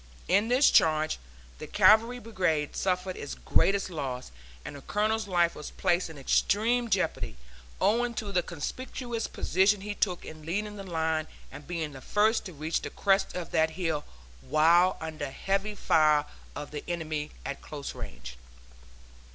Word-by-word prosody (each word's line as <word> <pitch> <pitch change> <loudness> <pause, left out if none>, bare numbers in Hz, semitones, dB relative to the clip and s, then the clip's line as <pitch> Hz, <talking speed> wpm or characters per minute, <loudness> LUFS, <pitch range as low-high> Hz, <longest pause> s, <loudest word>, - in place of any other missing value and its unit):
In 200 +5 +3
this 255 +4 +5
charge 155 0 +3 0.4
the - - -7
Cavalry 230 +3 +5
Brigade 180 -10 -1
suffered 185 0 -1
its 145 - -6
greatest 195 -1 +1
loss, 135 -6 -4 0.3
and - - -7
the 140 - -9
Colonel's 215 +5 0
life 175 -2 +2
was 150 - -7
placed 175 0 0
in 160 - -10
extreme 230 - +2
jeopardy, 185 - -1 0.4
owing 235 +2 +2
to 205 -2 -4
the 180 -2 +2
conspicuous 230 - -4
position 195 +2 +2
he 205 +1 -4
took 185 -4 -1
in 155 0 -9
leading 205 +6 -3
the 200 - -7
line, 160 -3 -1 0.2
and 145 - -11
being 165 -3 -3
the 135 -2 -10
first 215 - +2
to 185 - -7
reach 155 +2 -2
the - - -5
crest 195 -1 +1
of 180 -2 -5
that 160 -1 +3
hill, 160 -3 -2 0.4
while 170 - +4
under 155 -3 -5
heavy 195 +8 -1
fire 155 -5 +3 0.3
of 145 0 -6
the 150 -1 -5
enemy 155 -3 -3 0.2
at 140 - -5
close 145 -2 -6
range. 60 0 -9
175 Hz, 160 wpm, -29 LUFS, 155-205 Hz, 0.4 s, this